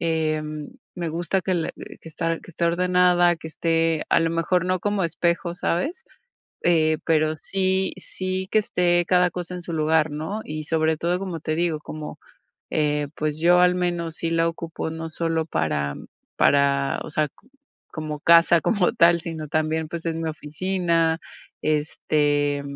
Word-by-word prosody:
em, 155 -2 -1 0.3
me 175 -2 -3
gusta 170 +4 -1
que 185 0 -1
le 165 -2 -1
que 165 - -11
está 165 +1 -2
que - - -14
esté 170 0 -2
ordenada, 180 0 +3
que 160 - -9
esté, 165 -1 0
a - - +5
lo 165 - +2
mejor 170 +2 +1
no 185 0 +1
como 205 +1 -1
espejo, 170 0 0
¿sabes?, 315 - -1 0.6
eh, 155 -2 +3
pero 155 -1 +2
sí 190 +1 0
sí 185 0 -4
que 215 - +4
esté 175 -4 +2
cada 180 -1 +3
cosa 180 0 -5
en 180 - -6
su 170 - -6
lugar, 155 0 +2
¿no?, 160 +8 -4
y 155 0 -5
sobre 160 0 +1
todo, 175 +2 0
como 185 -4 -4
te 155 +1 -2
digo, 170 -1 0
como, 150 0 -8 0.5
eh, 150 -1 +1
pues, 155 0 -2
yo 175 +2 +5
al 180 0 +4
menos 175 -2 -2
sí 165 - -2
la 165 0 +2
ocupo 165 -1 -5
no 160 0 -5
solo 165 0 -1
para 75 - -1 0.4
para, 140 -1 +3
o - - -7
sea, 155 -1 +1
co 195 - -28 0.5
como 155 -1 -5
casa 170 0 +6
como 200 -6 +2
tal, 170 0 +4
sino 160 -3 -6
también, 155 +1 0
pues, 170 +1 -6
es 165 - 0
mi 165 0 -3
oficina, 165 +1 0 0.4
este, 145 -1 +1
165 Hz, 170 wpm, -24 LUFS, 155-175 Hz, 0.6 s, casa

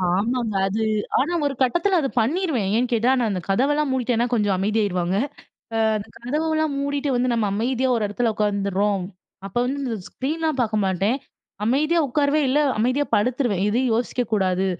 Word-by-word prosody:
ஆமங்க. 230 +1 -1
அது 215 +3 -1 0.4
ஆனா 315 +7 0
ஒரு 280 - 0
கட்டத்தில 345 +9 +2
அத 275 - 0
பண்ணிருவேன். 270 - 0
ஏன்னு 245 +1 +1
கேட்டா 235 +3 +3
நான் 230 -3 +1
அந்த 185 -2 -2
கதவெல்லாம் 285 +8 +2
மூடிட்டேனா 245 -2 +1
கொஞ்சம் 205 -4 +2
அமைதியாயிருவாங்க. 190 -3 0 0.6
ஆ - - +1 0.2
அந்த 205 0 -7
கதவெல்லாம் 310 +4 -1
மூடிட்டு 285 0 -1
வந்து 245 +1 +1
நம்ம 225 -3 +1
அமைதியா 250 +4 0
ஒரு 220 -2 0
இடத்துல 225 +2 0
உக்காந்துருறோம். 200 -2 0 0.4
அப்ப 200 - -9
வந்து 275 +3 -2
இந்த 230 -3 -2
ஸ்க்ரீன்லாம் 310 +1 -2
பார்க்க 215 -3 0
மாட்டேன். 195 +7 +1 0.5
அமைதியா 305 +8 +2
உட்காருவேந் 285 +1 +1
இல்ல 290 - +3 0.2
அமைதியா 255 +5 +1
படுத்துருவேன். 230 -3 +1
எதையும் 245 +3 +1
யோசிக்க 245 +1 -1
கூடாது. 190 -1 +1
240 Hz, 160 wpm, -23 LUFS, 210-280 Hz, 0.6 s, கேட்டா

